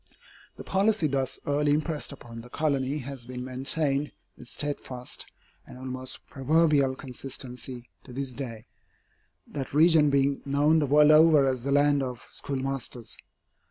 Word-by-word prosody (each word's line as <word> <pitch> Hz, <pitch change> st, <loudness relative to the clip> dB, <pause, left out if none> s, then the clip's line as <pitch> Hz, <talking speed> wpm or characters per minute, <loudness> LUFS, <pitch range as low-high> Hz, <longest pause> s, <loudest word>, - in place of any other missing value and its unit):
The -, -, -9 dB
policy 200 Hz, -1 st, +2 dB
thus 135 Hz, -3 st, -1 dB
early 145 Hz, +1 st, +1 dB
impressed 155 Hz, 0 st, -1 dB
upon 115 Hz, -4 st, -10 dB
the 120 Hz, -, -13 dB
colony 140 Hz, -1 st, 0 dB
has 135 Hz, -4 st, -7 dB
been 125 Hz, 0 st, -6 dB
maintained 135 Hz, +2 st, -1 dB, 0.2 s
with -, -, -12 dB
steadfast 130 Hz, -3 st, -4 dB, 0.4 s
and -, -, -11 dB
almost 130 Hz, 0 st, -5 dB
proverbial 140 Hz, -1 st, +2 dB
consistency 125 Hz, -1 st, -6 dB, 0.2 s
to 130 Hz, -, -11 dB
this 135 Hz, 0 st, -4 dB
day, 115 Hz, -4 st, -6 dB, 0.8 s
that 140 Hz, -1 st, -6 dB
region 160 Hz, -1 st, +6 dB
being 140 Hz, 0 st, +2 dB
known 145 Hz, +3 st, +3 dB
the 145 Hz, -, +1 dB
world 150 Hz, +2 st, +6 dB
over 155 Hz, -2 st, +6 dB
as 130 Hz, -2 st, 0 dB
the 140 Hz, +3 st, -2 dB
land 145 Hz, 0 st, +4 dB
of 125 Hz, -2 st, -5 dB
schoolmasters. 135 Hz, -3 st, -4 dB
140 Hz, 140 wpm, -27 LUFS, 130-150 Hz, 0.8 s, region